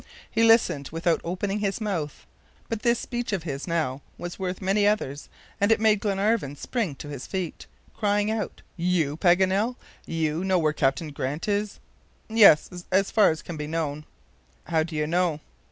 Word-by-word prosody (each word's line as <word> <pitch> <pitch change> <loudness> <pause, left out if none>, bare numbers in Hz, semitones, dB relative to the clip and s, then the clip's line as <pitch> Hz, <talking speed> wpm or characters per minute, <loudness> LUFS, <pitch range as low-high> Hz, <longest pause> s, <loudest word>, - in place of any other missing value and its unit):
He 225 - +1
listened 225 - +4
without 165 +1 +1
opening 195 +4 -2
his 200 0 -1
mouth. 175 -9 -3 0.4
But 225 -2 -3
this 235 0 +3
speech 240 -1 -4
of 185 -4 -1
his 145 -2 -5
now 155 -6 -1 0.2
was 175 +2 -7
worth 185 -1 -3
many 200 +2 +2
others, 150 -9 -1 0.3
and 200 +2 +4
it 225 - +4
made 215 -1 +4
Glenarvan 200 -6 0
spring 200 - -2
to 145 - -9
his 140 -3 -7
feet, 185 -4 -4 0.3
crying 205 0 +1
out: 220 -2 -4
"You, 170 -5 +1
Paganel! 190 +7 +3 0.3
you 160 +1 -1
know 190 -1 +2
where 155 -3 +2
Captain 145 +2 0
Grant 145 +3 -4
is?" 205 0 -1 0.5
"Yes, 185 -5 +5
as 190 +1 +2
far 215 -2 +5
as 160 -1 -3
can 170 - -7
be 150 0 -4
known." 150 -2 -3 0.6
"How 160 - +1
do 160 0 -4
you 150 0 0
know?" 170 -1 +1
180 Hz, 170 wpm, -26 LUFS, 155-205 Hz, 0.6 s, Yes